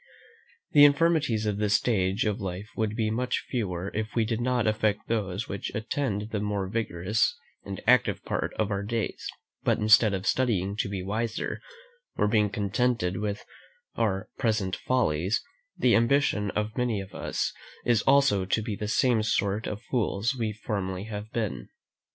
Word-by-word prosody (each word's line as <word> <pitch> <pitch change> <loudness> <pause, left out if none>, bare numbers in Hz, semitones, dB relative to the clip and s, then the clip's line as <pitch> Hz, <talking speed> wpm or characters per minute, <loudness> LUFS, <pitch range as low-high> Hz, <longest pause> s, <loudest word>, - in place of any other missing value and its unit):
The 145 - +7
infirmities 145 -7 +4
of 105 -1 0
this 105 -1 +2
stage 95 -4 +1
of 105 0 -1
life 95 +2 -5
would 110 -1 -1
be 110 -2 0
much 125 +3 -1
fewer 95 -6 -2
if 110 0 -3
we 115 -2 +2
did 115 +1 -2
not 125 -1 +1
affect 110 -1 0
those 105 -1 -2
which 100 - -4
attend 110 -2 -2
the 105 - -1
more 100 -2 -1
vigorous 105 -1 0 0.3
and 100 -1 -5
active 125 0 +3
part - - -1
of 110 -1 -1
our 100 0 -1
days; 110 +1 -3 0.3
but - - +2
instead 110 -1 +5
of 95 +1 -5
studying 100 -8 +1
to 105 - -1
be 95 -2 -4
wiser, 110 +3 -2 0.5
or - - +2
being 105 -1 +3
contented 100 -1 0
with 105 0 -3 0.5
our 95 -4 0
present 105 -5 +1
follies, 95 -6 0 0.3
the 125 - +4
ambition 115 -4 +2
of 105 +2 -2
many 120 -4 0
of 95 0 -8
us - - -2 0.3
is 120 -2 +3
also 135 -8 +4
to 95 +4 0
be 105 -2 -3
the 105 - -4
same 115 +1 +3
sort 105 -1 0
of 105 +2 -5
fools 115 +1 0
we 115 -3 -1
formerly 100 -3 -3
have 105 0 -6
been. 105 - -3
105 Hz, 165 wpm, -27 LUFS, 100-115 Hz, 0.5 s, The